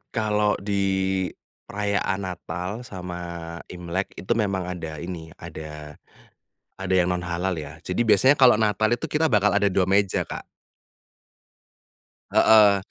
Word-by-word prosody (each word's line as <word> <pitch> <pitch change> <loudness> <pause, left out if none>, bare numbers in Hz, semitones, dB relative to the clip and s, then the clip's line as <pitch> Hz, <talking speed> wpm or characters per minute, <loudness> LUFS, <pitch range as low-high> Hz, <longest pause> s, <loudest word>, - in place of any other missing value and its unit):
kalau 105 -1 +1
di 100 -1 0 0.9
perayaan 100 -1 -1
Natal 90 0 -5
sama 90 -6 -7 0.5
Imlek 90 +2 -3
itu 95 - 0
memang 100 -4 -1
ada 80 -4 -6
ini 85 -2 -6
ada 75 -2 -9 0.8
ada 95 -1 -3
yang 90 -1 +3
non 90 -1 -1
halal 90 +1 -2
ya 75 -2 -8
jadi 90 - -3
biasanya 130 +5 +5
kalau 125 -5 +6
Natal 110 +1 +2
itu 120 - -1
kita 155 +1 +1
bakal 105 -1 +4
ada 100 - +3
2 90 -1 +2
meja 100 0 +2
Kak. - - -6 1.9
Heeh, 105 -2 +6
95 Hz, 130 wpm, -24 LUFS, 90-105 Hz, 1.9 s, kalau